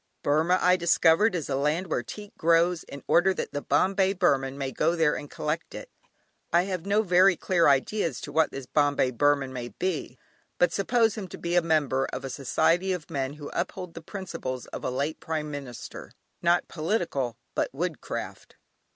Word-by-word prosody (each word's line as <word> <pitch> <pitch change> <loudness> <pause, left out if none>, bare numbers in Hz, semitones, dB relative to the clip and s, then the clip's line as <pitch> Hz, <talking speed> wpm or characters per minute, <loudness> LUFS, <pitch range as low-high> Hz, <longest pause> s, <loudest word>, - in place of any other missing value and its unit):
Burmah, 160 +5 +3
I 180 +1 +4
discovered, 170 +3 +4
is 165 -5 -3
a 135 - -1
land 150 +6 0
where 160 -8 -1
teak 205 - -10
grows, 170 +1 +3
in 140 -1 -10
order 185 +2 +4
that - - -4
the 145 - -3
"Bombay 190 +7 +2
Burman" 140 -8 +1
may 135 -1 -3
go 165 +5 +1
there 160 -3 +3
and 145 - -7
collect 155 +2 -4
it. - - -9 0.6
I 170 +1 +4
have 185 -1 -4
no 210 +2 +3
very 185 0 +5
clear 170 0 +2
idea 145 +9 +2
as - - -6
to 145 - -7
what 160 +1 +3
this 135 -1 -7
"Bombay 145 -2 +2
Burman" 140 +1 +1
may 120 -2 -5
be, 160 -4 -3 0.4
but 175 -1 +3
suppose 225 +2 +2
him 205 -4 -6
to - - -9
be 170 0 -3
a 175 - +5
member 150 -5 +1
of - - -6
a 135 - -4
society 170 +8 +1
of 175 -5 -6
men 135 -1 -2
who 145 -1 -8
uphold 180 0 -4
the - - -8
principles 165 - -6
of - - -6
a - - -1
late 140 +5 -2
Prime 155 -2 -3
Minister; 140 -4 -8 0.3
not 175 0 +2
political, 155 - -2 0.2
but - - 0
woodcraft. 160 +4 -5
160 Hz, 190 wpm, -27 LUFS, 140-180 Hz, 0.6 s, very